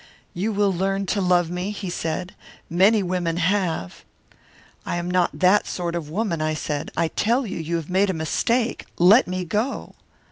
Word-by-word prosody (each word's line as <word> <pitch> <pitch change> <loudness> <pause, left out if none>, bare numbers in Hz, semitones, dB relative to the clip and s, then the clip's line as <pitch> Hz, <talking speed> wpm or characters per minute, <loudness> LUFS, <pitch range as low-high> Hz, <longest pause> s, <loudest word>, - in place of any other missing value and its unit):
"'You 200 +6 -1
will 200 -1 +2
learn 195 +2 -1
to 200 +2 0
love 175 -2 +2
me,' 180 +2 -3
he 200 -3 -5
said. 175 +2 -3 0.4
'Many 195 +5 +4
women 175 -2 -1
have.' 175 - -1 0.8
"'I - - -3
am 175 +1 -3
not 180 -1 +1
that 185 +3 +4
sort 175 -2 -3
of 165 -4 -4
a - - -11
woman,' 185 -4 -1
I 155 0 0
said. 150 -1 -3
'I 165 - +2
tell 240 +9 +1
you, 195 - -5
you 165 +1 -2
have 165 -2 -3
made 195 +2 +3
a - - +1
mistake. 225 +9 -1
Let 200 +9 +6
me 185 0 -3
go.' 215 +10 -2
180 Hz, 185 wpm, -23 LUFS, 170-200 Hz, 0.8 s, Let